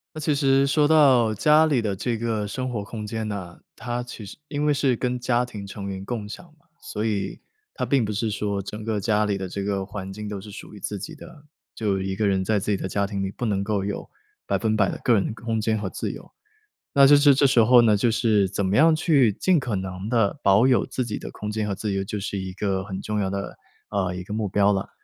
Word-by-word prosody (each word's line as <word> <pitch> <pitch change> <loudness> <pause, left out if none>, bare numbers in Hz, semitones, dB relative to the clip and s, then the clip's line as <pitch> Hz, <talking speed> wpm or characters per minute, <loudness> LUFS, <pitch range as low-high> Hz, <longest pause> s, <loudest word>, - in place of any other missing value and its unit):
那 - - -5
其 150 0 +1
实 135 -1 +3
说 145 +1 +3
到 135 -8 +5
家 155 +8 +5
里 130 -6 +1
的 100 -3 -1
这 115 +3 -2
个 110 -2 -2
生 130 +5 -4
活 110 -4 -3
空 105 +1 -7
间 110 0 -4
呢， 95 -5 -6 0.2
它 120 +1 -4
其 120 -3 -9
实 100 - -10
因 145 0 -2
为 150 - +3
是 135 -3 +2
跟 125 +1 -2
家 120 0 +1
庭 105 -5 -8
成 100 0 -7
员 95 -1 -5
共 110 -1 -4
享 115 - -8 0.2
嘛， - - -34 0.2
所 105 - -4
以 100 -3 -2 0.4
它 - - -2
并 135 -4 +2
不 105 - -2
是 110 +1 -1
说 100 -1 -2
整 105 +3 -7
个 110 -1 -1
家 105 0 +1
里 100 -1 0
的 95 -1 -4
这 100 +2 -4
个 100 -1 -1
环 95 -1 -7
境 105 +2 -7
都 100 -2 -5
是 105 - -11
属 100 - -10
于 105 - -10
自 105 - -4
己 155 - -7
的。 160 -1 -13 0.3
就 100 -4 -1
一 95 0 -3
个 105 +1 +1
人 95 -1 +1
在 105 +2 +1
自 105 +2 -2
己 - - +2
的 95 - -4
家 100 +2 0
庭 100 -1 -3
里 95 - -3
不 120 - -5
能 100 -3 0
够 100 -1 -1
有 100 0 -5 0.4
100% 110 -3 +1
的 - - -5
个 120 - +4
人 100 -4 +2
的 - - -4
空 115 -1 -3
间 110 0 0
和 105 - -3
自 - - -4
由， - - -11 0.6
那 140 -1 +7
就 145 - +8
是 145 -1 +6
这 140 - +3
时 125 -4 +4
候 125 +2 +7
呢， 110 -3 +4
就 110 +4 +2
是 110 -4 +2
怎 100 0 -1
么 95 +2 +1
样 160 +3 +6
去 145 -8 +3
尽 180 - +2
可 125 -6 -2
能 95 +1 -5
地 115 +1 +1
保 100 +5 +5
有 125 - +3
自 130 - -3
己 105 - -4
的 - - -7
空 105 - -5
间 105 0 -2
和 100 - -2
自 105 +1 -3
由 95 0 -1
就 105 +1 -4
是 100 0 -3
一 95 -1 -5
个 95 0 -2
很 95 -1 -5
重 105 +1 -3
要 100 -2 0
的， 100 0 -5 0.3
呃， 95 -3 -1
一 90 - -5
个 100 - -9
目 110 -1 -1
标 100 +1 +3
了。 95 - -3
105 Hz, 280 characters per minute, -24 LUFS, 100-125 Hz, 0.6 s, 就